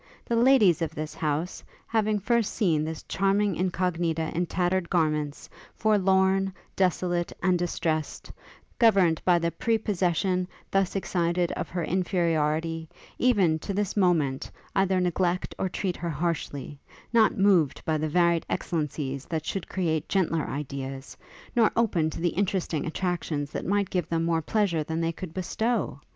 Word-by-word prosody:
The 235 - 0
ladies 230 - +5
of 165 - -2
this 155 0 -4
house, 155 +2 -2 0.2
having 215 -2 +1
first 225 +1 0
seen 160 -7 +2
this 160 0 -5
charming 195 0 +1
Incognita 170 -3 -1
in 175 +1 0
tattered 180 0 0
garments, 155 -4 0 0.3
forlorn, 195 -2 +3 0.2
desolate, 175 -2 0
and 185 -2 +3
distressed; 160 -3 -2 0.5
governed 195 -9 +4
by 180 -1 +5
the 170 0 0
prepossession 185 -5 0 0.2
thus 195 -1 +1
excited 175 -2 0
of - - -4
her 175 -1 -2
inferiority, 165 -3 0 0.3
even, 195 -11 +3
to 200 +4 -4
this 205 -1 -1
moment, 165 -9 +1 0.3
either 190 -1 +2
neglect 180 0 0
or 190 - 0
treat 185 -1 -2
her 170 - -3
harshly; 145 -3 -3 0.3
not 225 -2 +4
moved 190 -7 +3
by 155 -1 +1
the 155 +1 -1
varied 170 0 +3
excellencies 145 -4 -2
that 160 -2 -3
should 195 +1 -4
create 160 -5 -1
gentler 165 -5 +1
ideas, 135 -1 -5 0.4
nor 230 -3 +5
open 180 -9 +2
to - - -6
the 175 +1 +1
interesting 180 -4 -1
attractions 160 -4 -2
that - - -4
might 200 0 +1
give 180 -4 -1
them 165 0 0
more 165 -1 +1
pleasure 175 -3 +1
than 160 +2 -3
they 165 0 0
could 170 0 -8
bestow! 195 0 -2
175 Hz, 145 wpm, -27 LUFS, 160-195 Hz, 0.5 s, ladies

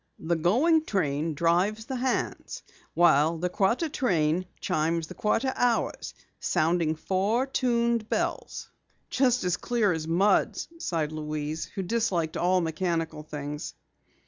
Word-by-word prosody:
The 170 +1 -1
going 260 - +3
train 155 - -1
drives 180 +8 +1
the 260 +1 -4
hands, 255 +1 -2 0.3
while 165 -1 +4
the 180 +2 -1
quarter 210 - +1
train 180 - 0
chimes 165 +1 0
the - - -10
quarter 260 +5 0
hours, 245 -2 0 0.2
sounding 165 -1 +1
four 195 +9 0
tuned 235 -4 0
bells." - - -3 0.4
"Just 250 -4 +2
as 180 -1 0
clear 230 -5 +1
as 160 -1 -4
mud," 190 +5 +2 0.2
sighed 160 - -1
Louise 155 0 -4
who 195 - -5
disliked 180 -6 0
all 185 +1 +2
mechanical 165 -1 -2
things. 150 -1 -6
175 Hz, 125 wpm, -27 LUFS, 160-230 Hz, 0.4 s, while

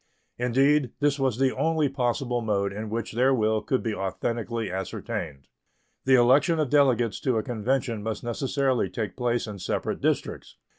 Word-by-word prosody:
Indeed, 135 +2 +2
this 145 -1 +1
was 130 -4 +1
the 130 0 +1
only 160 -2 +1
possible 125 -2 -1
mode 100 -3 0
in 105 +1 -5
which 115 0 -3
their 130 +3 +3
will 110 -2 +1
could 130 -4 -1
be 115 - -1
authentically 115 +3 -3
ascertained. 85 -6 -5 0.6
The 130 0 +6
election 130 +7 +4
of 150 -5 0
delegates 130 -6 +3
to 130 -4 0
a 110 - 0
convention 120 0 -1
must 110 0 -4
necessarily 130 -2 0
take 95 0 -4
place 120 -1 0
in 105 -3 -7
separate 90 - -2
districts. - - -2
120 Hz, 160 wpm, -26 LUFS, 110-135 Hz, 0.6 s, The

